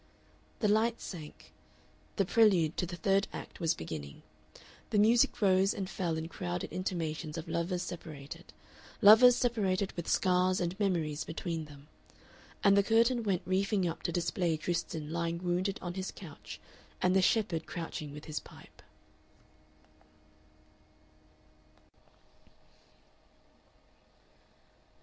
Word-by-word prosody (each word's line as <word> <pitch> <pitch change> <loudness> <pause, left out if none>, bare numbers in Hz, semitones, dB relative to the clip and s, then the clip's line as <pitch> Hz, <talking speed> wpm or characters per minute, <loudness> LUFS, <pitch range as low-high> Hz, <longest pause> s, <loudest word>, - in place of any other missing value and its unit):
The 215 - +3
lights 220 +3 +2
sank, 160 -5 -9 0.6
the 195 - +1
prelude 185 -7 +4
to 180 - -1
the 175 - -6
third 195 +3 +1
act - - -9
was 165 -3 +1
beginning, 75 -3 -7 0.7
the 215 - 0
music 225 +3 +4
rose 190 0 +4
and 195 -2 -3
fell 170 -4 -2
in 160 0 -4
crowded 90 - -5
intimations 165 -3 -3
of 165 +1 -6
lovers 175 +2 -1
separated 150 -5 -9 0.5
lovers 225 +4 +8
separated 200 -6 0
with 170 - -6
scars 185 0 +2
and 175 0 -1
memories 165 -7 0
between 165 -1 -4
them, 145 -1 -14 0.8
and 200 -1 +6
the 200 - +6
curtain 230 +4 +3
went 195 -5 -1
reefing 190 +1 +1
up 165 - -4
to - - -2
display 170 -1 0
Tristan 160 -2 -3
lying 170 0 -1
wounded 180 +3 -1
on 175 -1 -4
his 190 +1 -4
couch 160 -7 -10 0.4
and 185 +1 +2
the 190 - +5
shepherd 185 -5 +1
crouching 160 -3 -5
with 150 +1 -10
his 155 -1 -4
pipe. - - -16
180 Hz, 120 wpm, -31 LUFS, 160-195 Hz, 0.8 s, lovers